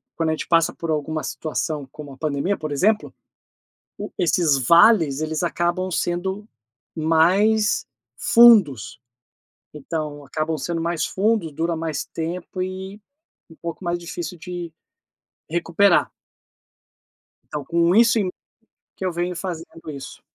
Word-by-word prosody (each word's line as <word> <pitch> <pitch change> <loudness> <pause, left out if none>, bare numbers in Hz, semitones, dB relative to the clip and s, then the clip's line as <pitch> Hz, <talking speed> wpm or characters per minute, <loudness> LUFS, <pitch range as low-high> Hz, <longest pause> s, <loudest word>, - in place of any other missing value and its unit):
quando 165 -1 0
a - - +2
gente 155 - -5
passa 165 -1 +3
por 165 - -6
alguma 155 +1 -2
situação 155 -2 -3
como 145 -2 -10
a - - -15
pandemia, 155 +6 -1
por 155 -1 -5
exemplo, 210 +9 +1 0.9
o - - -6
esses 165 -4 +3
vales, 170 -5 +6
eles 155 +1 -2
acabam 175 +2 -1
sendo 190 +5 -2 0.5
mais 185 +7 +3 0.3
fundos. 190 - +5 0.7
Então, 150 -1 -5
acabam 155 +2 -2
sendo 165 +4 -3
mais 170 -1 -1
fundos, 200 -5 0
dura 165 +2 -1
mais 160 -3 -3
tempo 175 +3 -5
e 190 +2 -5 0.5
um 165 - -15
pouco 170 +2 -7
mais 175 0 -1
difícil 170 0 -6
de 175 -2 -6 0.8
recuperar. 175 +3 +2 1.4
tão, 150 -1 -3
com 170 +2 +2
isso 230 0 +5
em 185 -3 0 0.7
que 190 - -4
eu 185 - 0
venho 175 +1 -2
fazendo 165 -3 -7
isso. 140 -2 -8
170 Hz, 130 wpm, -22 LUFS, 155-185 Hz, 1.4 s, vales